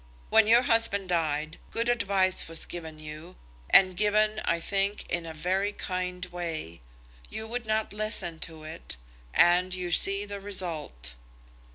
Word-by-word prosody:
When 220 -1 +6
your 235 +3 +6
husband 225 -5 +3
died, 155 -2 -1
good 230 +1 -2
advice 200 -5 +2
was 165 0 +3
given 160 -3 -7
you, 155 +3 -9 0.3
and 185 -1 +6
given, 215 +2 +2
I 170 - +1
think, 200 +3 0
in 170 -1 -1
a 160 - -6
very 190 +5 0
kind 180 -1 -3
way. 165 - -5 0.5
You 220 - -4
would 235 0 -5
not 215 -1 0
listen 210 -6 -2
to 160 -1 -12
it, 155 - -7 0.3
and 180 - +4
you 180 -1 -4
see 195 +4 +2
the 200 0 -6
result." 165 - -3
185 Hz, 150 wpm, -28 LUFS, 165-205 Hz, 0.5 s, When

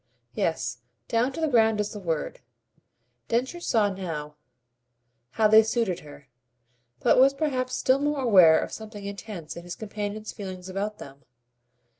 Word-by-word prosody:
"Yes - - -2 0.3
down 235 +3 +1
to - - -6
the 320 - +1
ground 225 -5 +3
is 210 0 -1
the 210 - -7
word." 165 -5 -3 0.9
Densher 255 +9 -1
saw 215 - +1
now 160 -6 -5 1.0
how 220 - +4
they 220 +1 +8
suited 220 -5 -1
her, 145 -2 -14 0.7
but - - +4
was 270 +1 +6
perhaps 255 -4 -1
still 260 +1 +2
more 290 0 0
aware 185 -9 +7
of - - -4
something 215 -2 -8
intense 200 -5 -7
in 170 - -8
his 175 0 -7
companion's 210 0 -5
feeling 185 -2 -7
about 200 +3 -3
them. 140 +1 -12
210 Hz, 150 wpm, -26 LUFS, 185-235 Hz, 1.0 s, they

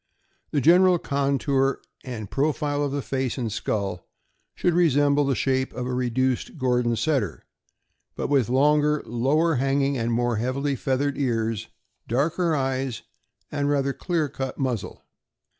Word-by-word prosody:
The 145 - 0
general 180 +4 +6
contour 140 -2 0 0.2
and 115 -5 -6
profile 145 +2 0
of 140 - -1
the 140 -1 -2
face 130 -1 -2
and 120 -4 -2
skull 100 -4 -3 0.5
should 175 - +1
resemble 145 -4 +3
the 135 -1 +1
shape 130 0 0
of 125 +1 -4
a 125 - -3
reduced 125 +3 -1
Gordon 125 -3 +1
Setter, 140 +4 -1 0.7
but - - -2
with 135 -5 +2
longer, 150 +3 +3
lower 140 +7 +1
hanging, 135 +1 +1
and 115 +1 -1
more 120 0 +1
heavily 135 +5 -1
feathered 135 +3 -1
ears, 115 -4 -1 0.4
darker 160 +7 +1
eyes, 130 -2 -2 0.5
and 145 -1 -1
rather 140 -1 +1
clearer 165 -2 -1
cut 135 -1 -5
muzzle. 125 -7 -3
135 Hz, 140 wpm, -25 LUFS, 125-145 Hz, 0.7 s, general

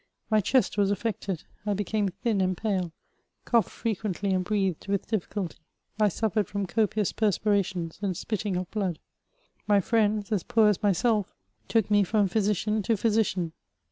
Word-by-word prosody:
My 215 -1 +5
chest 210 0 +2
was 200 -1 +3
affected; 200 -4 -2 0.2
I 205 -1 0
became 205 +1 0
thin 200 +2 -1
and 185 -1 0
pale; 190 -6 -1 0.5
coughed 235 -2 +3
frequently, 205 -3 -2
and 185 -1 +1
breathed 195 -4 -1
with 200 -1 0
difficulty; 205 -4 -3 0.4
I 210 - +5
suffered 215 0 0
from 200 -1 -2
copious 210 +1 +1
perspirations 200 -5 0
and 190 -4 -1
spitting 210 -3 -2
of 180 0 -4
blood. 190 -6 -1 0.7
My 205 -1 +5
friends, 215 0 +1
as 205 -4 +1
poor 225 +1 +4
as 205 - 0
myself, 205 +1 +1 0.3
took 220 -2 +1
me 205 -1 +5
from 205 +1 +2
physician 210 +2 +1
to 220 +3 +1
physician. 195 -6 +1
205 Hz, 155 wpm, -27 LUFS, 190-215 Hz, 0.7 s, My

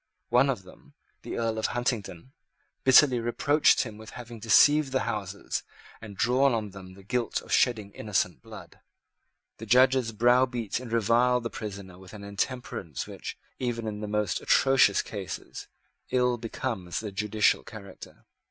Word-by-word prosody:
One 125 +3 +4
of 120 -8 -2
them, 90 - -18 0.3
the - - -6
Earl 115 -1 -1
of 110 - 0
Huntingdon, 120 -4 -3 0.5
bitterly 130 -1 +6
reproached 145 +6 +3
him 110 -4 -6
with 110 - -11
having 120 -1 -9
deceived 135 +7 +5
the 130 - +1
Houses 100 -1 -4 0.4
and 105 -3 -10
drawn 130 +3 +3
on 105 -3 -3
them 95 -1 -12
the 95 - -15
guilt 120 +3 -1
of - - -13
shedding 110 -5 +2
innocent 100 - -2
blood. - - -12 0.8
The 115 - -9
Judges 125 0 +4
browbeat 120 0 +2
and 125 -3 -9
reviled 115 +2 +2
the 115 - -4
prisoner 100 -4 -8
with 95 +1 -14
an 100 - -10
intemperance 100 - -4
which, - - -8 0.2
even 120 -3 -2
in 105 -1 -4
the 105 - -5
most 105 -3 -1
atrocious 135 -7 +4
cases, 100 -4 -7 0.4
ill 125 -1 +1
becomes 110 -6 -4
the 105 -2 -6
judicial 105 +2 +1
character. 100 -4 -12
115 Hz, 150 wpm, -27 LUFS, 100-125 Hz, 0.8 s, bitterly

